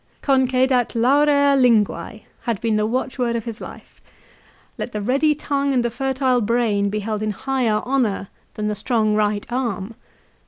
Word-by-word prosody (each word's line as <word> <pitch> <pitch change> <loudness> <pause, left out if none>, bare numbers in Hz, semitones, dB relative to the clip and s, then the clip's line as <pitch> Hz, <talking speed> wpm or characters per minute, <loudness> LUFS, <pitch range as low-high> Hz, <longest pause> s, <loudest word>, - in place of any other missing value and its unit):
" - - -38
Concedat 260 -2 +2
laurea 285 +3 +4
linguae 230 -3 +1
" - - -37
had 230 -4 0
been 225 -2 0
the 215 0 +1
watchword 250 0 -1
of 230 - -3
his 230 -1 -7
life. - - -11 0.4
" - - -32
Let 245 - -5
the 210 - -3
ready 280 +6 +2
tongue 280 -2 -1
and 245 -1 +1
the 235 - -1
fertile 260 0 0
brain 215 -3 +1
be 210 +1 -2
held 215 0 -3
in 215 - -1
higher 230 -1 -1
honour 240 -7 0 0.3
than 210 0 -2
the 210 - 0
strong 215 0 0
right 210 -1 0
arm." 230 -5 -2
235 Hz, 180 wpm, -21 LUFS, 215-265 Hz, 0.4 s, laurea